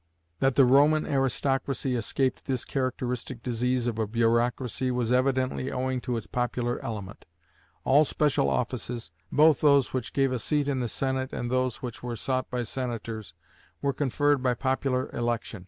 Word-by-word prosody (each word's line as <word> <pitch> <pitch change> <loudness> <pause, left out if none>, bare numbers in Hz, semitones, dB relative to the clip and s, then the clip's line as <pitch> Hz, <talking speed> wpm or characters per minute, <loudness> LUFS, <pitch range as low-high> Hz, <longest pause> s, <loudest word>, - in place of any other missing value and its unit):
That 135 -1 +2
the 135 - +7
Roman 145 +4 +5
aristocracy 135 0 0
escaped 130 +3 -1
this 130 -3 -1
characteristic 125 -2 -3
disease 125 0 0
of 115 -2 -2
a 110 - 0
bureaucracy 120 +3 +1
was 125 -2 0
evidently 130 0 +1
owing 130 0 -1
to 120 -1 -2
its 115 - -5
popular 120 0 -2
element. 105 -3 -6 0.6
All 145 +3 +5
special 150 -1 +1
offices, 120 -6 -3 0.2
both 155 +1 +5
those 140 -3 +4
which 130 -3 -3
gave 135 -1 +2
a 125 - -1
seat 145 +4 0
in 140 -2 0
the 120 -2 -2
Senate 130 +1 -1
and 120 0 -4
those 130 -2 0
which 120 -2 -6
were 120 -1 -4
sought 130 +2 -2
by 125 -1 -2
senators, 115 -6 -5 0.4
were 140 -1 0
conferred 145 +1 +1
by 125 -1 +1
popular 130 0 0
election. 120 -3 -2
125 Hz, 160 wpm, -27 LUFS, 120-135 Hz, 0.6 s, the